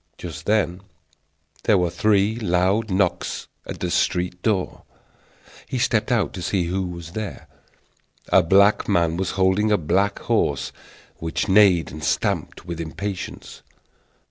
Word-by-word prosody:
Just -, -, -8 dB
then 100 Hz, -4 st, +1 dB, 0.8 s
there 105 Hz, -, +5 dB
were 90 Hz, -2 st, +1 dB
three 105 Hz, +2 st, +2 dB
loud 100 Hz, +1 st, +1 dB
knocks 95 Hz, -1 st, -1 dB, 0.2 s
at -, -, -6 dB
the 90 Hz, -, -1 dB
street 90 Hz, 0 st, 0 dB
door. 95 Hz, -3 st, -1 dB, 0.9 s
He 130 Hz, -, -3 dB
stepped 115 Hz, -3 st, +1 dB
out 110 Hz, -11 st, +1 dB
to 90 Hz, -, -6 dB
see 90 Hz, +1 st, 0 dB
who 90 Hz, +3 st, -1 dB
was 85 Hz, -2 st, -8 dB
there. 110 Hz, +1 st, -6 dB, 0.8 s
A -, -, +6 dB
black 100 Hz, +6 st, +4 dB
man 85 Hz, -4 st, +2 dB
was 95 Hz, +1 st, -2 dB
holding 95 Hz, +3 st, +2 dB
a 105 Hz, -, +4 dB
black 95 Hz, +5 st, +1 dB
horse, -, -, 0 dB, 0.5 s
which 80 Hz, +5 st, -2 dB
neighed 95 Hz, -4 st, +4 dB
and 75 Hz, 0 st, -8 dB
stamped 75 Hz, -, -1 dB
with 85 Hz, -2 st, -5 dB
impatience. 95 Hz, +4 st, -6 dB
95 Hz, 140 wpm, -23 LUFS, 85-105 Hz, 0.9 s, A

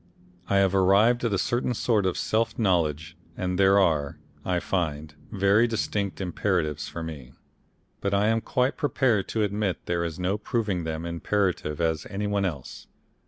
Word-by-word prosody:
I 100 Hz, -, +2 dB
have 100 Hz, -1 st, +3 dB
arrived 100 Hz, +6 st, +4 dB
at 115 Hz, -, +1 dB
a -, -, 0 dB
certain 120 Hz, +5 st, 0 dB
sort 105 Hz, -4 st, +1 dB
of 90 Hz, -, -1 dB
self 115 Hz, +1 st, 0 dB
knowledge 80 Hz, -6 st, 0 dB, 0.2 s
and 90 Hz, 0 st, -2 dB
there 95 Hz, 0 st, +5 dB
are, 80 Hz, -7 st, +1 dB, 0.3 s
I 90 Hz, -1 st, 0 dB
find, 80 Hz, -5 st, -2 dB, 0.2 s
very 100 Hz, +3 st, +3 dB
distinct 100 Hz, -6 st, -2 dB
imperatives 85 Hz, -4 st, -1 dB
for 85 Hz, -, -6 dB
me, 70 Hz, -6 st, -8 dB, 0.7 s
but 100 Hz, -, -2 dB
I 100 Hz, +2 st, +2 dB
am 115 Hz, 0 st, +1 dB
quite 125 Hz, +4 st, 0 dB
prepared 125 Hz, -8 st, +1 dB
to 110 Hz, -, -1 dB
admit 100 Hz, -2 st, -2 dB
there 85 Hz, -1 st, -1 dB
is 85 Hz, -2 st, -4 dB
no 95 Hz, +3 st, -1 dB
proving 105 Hz, -7 st, -2 dB
them 80 Hz, +1 st, -4 dB
imperative 85 Hz, -2 st, -1 dB
on 80 Hz, -1 st, +1 dB
any 100 Hz, +1 st, -3 dB
one 100 Hz, -1 st, 0 dB
else. 75 Hz, -8 st, -6 dB
95 Hz, 165 wpm, -26 LUFS, 85-105 Hz, 0.7 s, there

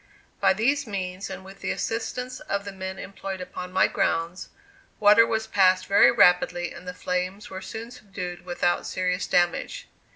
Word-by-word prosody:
By -, -, +4 dB
these 275 Hz, +7 st, +1 dB
means 190 Hz, -1 st, -4 dB
and 190 Hz, 0 st, -8 dB
with 195 Hz, +1 st, -12 dB
the -, -, -4 dB
assistance 250 Hz, +2 st, -3 dB
of 200 Hz, -10 st, -3 dB
the 200 Hz, -, -5 dB
men 190 Hz, 0 st, -6 dB
employed 195 Hz, -1 st, -6 dB
upon 180 Hz, 0 st, -7 dB
my 190 Hz, +1 st, +4 dB
grounds, 170 Hz, +3 st, -1 dB, 0.5 s
water 215 Hz, +2 st, +7 dB
was 220 Hz, -1 st, -1 dB
passed 190 Hz, -4 st, +3 dB
very 200 Hz, -, +6 dB
rapidly 175 Hz, 0 st, +3 dB
and 180 Hz, -, -12 dB
the 180 Hz, -, -4 dB
flames 185 Hz, +3 st, -3 dB
were 190 Hz, 0 st, -6 dB
soon 230 Hz, +4 st, -7 dB
subdued 195 Hz, -7 st, -7 dB
without 175 Hz, -1 st, 0 dB
serious 180 Hz, 0 st, -1 dB
damage. 180 Hz, -, 0 dB
190 Hz, 165 wpm, -25 LUFS, 180-215 Hz, 0.5 s, water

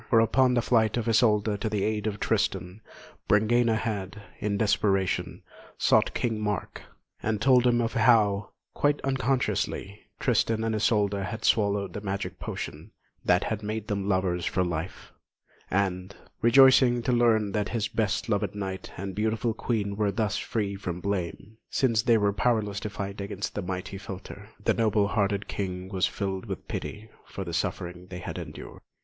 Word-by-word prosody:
For 115 Hz, -, +5 dB
upon 125 Hz, +3 st, +3 dB
the 120 Hz, -, +2 dB
flight 110 Hz, -2 st, +2 dB
of 120 Hz, -1 st, -2 dB
Isolda 110 Hz, -2 st, +3 dB
to 110 Hz, -, -1 dB
the 105 Hz, -2 st, -1 dB
aid 110 Hz, 0 st, -1 dB
of 105 Hz, -1 st, -3 dB
Tristan, 100 Hz, -3 st, -1 dB, 0.5 s
Brangæna 110 Hz, +3 st, +3 dB
had, 105 Hz, -3 st, -3 dB, 0.2 s
in 100 Hz, -1 st, -1 dB
desperation, 100 Hz, -2 st, +1 dB, 0.3 s
sought -, -, +3 dB
King 115 Hz, -3 st, -1 dB
Mark, 105 Hz, -2 st, -3 dB, 0.4 s
and 110 Hz, -1 st, -1 dB
told 125 Hz, +1 st, +5 dB
him 120 Hz, -1 st, +3 dB
of 115 Hz, -1 st, 0 dB
how, 110 Hz, -4 st, +3 dB, 0.2 s
quite 145 Hz, 0 st, +1 dB
unconsciously, 130 Hz, -6 st, -1 dB, 0.2 s
Tristan 110 Hz, -1 st, +1 dB
and 115 Hz, 0 st, 0 dB
Isolda 105 Hz, -2 st, +1 dB
had 110 Hz, +2 st, -5 dB
swallowed 100 Hz, -2 st, +2 dB
the 105 Hz, -, -5 dB
magic 95 Hz, -2 st, -4 dB
potion -, -, -6 dB, 0.3 s
that -, -, +3 dB
had 110 Hz, -1 st, -2 dB
made 110 Hz, +1 st, -4 dB
them 100 Hz, -1 st, -1 dB
lovers 95 Hz, -2 st, +1 dB
for 90 Hz, -, +1 dB
life; 85 Hz, 0 st, -4 dB, 0.6 s
and, 95 Hz, 0 st, -1 dB, 0.3 s
rejoicing 125 Hz, 0 st, +6 dB
to 125 Hz, -, +1 dB
learn 115 Hz, -4 st, +3 dB
that 105 Hz, 0 st, -1 dB
his 115 Hz, -3 st, -1 dB
best 110 Hz, -2 st, -1 dB
loved 105 Hz, -2 st, 0 dB
knight 95 Hz, -2 st, -5 dB
and 95 Hz, +1 st, -4 dB
beautiful 110 Hz, +3 st, 0 dB
Queen 105 Hz, -3 st, -2 dB
were 105 Hz, -1 st, +1 dB
thus 105 Hz, -1 st, -1 dB
free 100 Hz, -3 st, -2 dB
from 90 Hz, -3 st, -5 dB
blame, 100 Hz, +2 st, -4 dB
since 115 Hz, -5 st, +2 dB
they 115 Hz, +1 st, +4 dB
were 100 Hz, -1 st, +2 dB
powerless 105 Hz, -3 st, 0 dB
to 105 Hz, -, -4 dB
fight 100 Hz, 0 st, -5 dB
against 100 Hz, 0 st, -4 dB
the 105 Hz, -, -3 dB
mighty 95 Hz, +1 st, -5 dB
philtre, 100 Hz, +1 st, -9 dB, 0.2 s
the -, -, +4 dB
noble 105 Hz, -3 st, +2 dB
hearted 100 Hz, -2 st, 0 dB
King 95 Hz, -1 st, -4 dB
was 95 Hz, -2 st, +1 dB
filled 95 Hz, +1 st, -4 dB
with 95 Hz, -4 st, -6 dB
pity 110 Hz, +1 st, -6 dB, 0.2 s
for 95 Hz, -, -6 dB
the 85 Hz, -2 st, -6 dB
sufferings 90 Hz, +1 st, -3 dB
they 90 Hz, -, -6 dB
had -, -, -6 dB
endured. -, -, -9 dB
105 Hz, 165 wpm, -27 LUFS, 100-115 Hz, 0.6 s, rejoicing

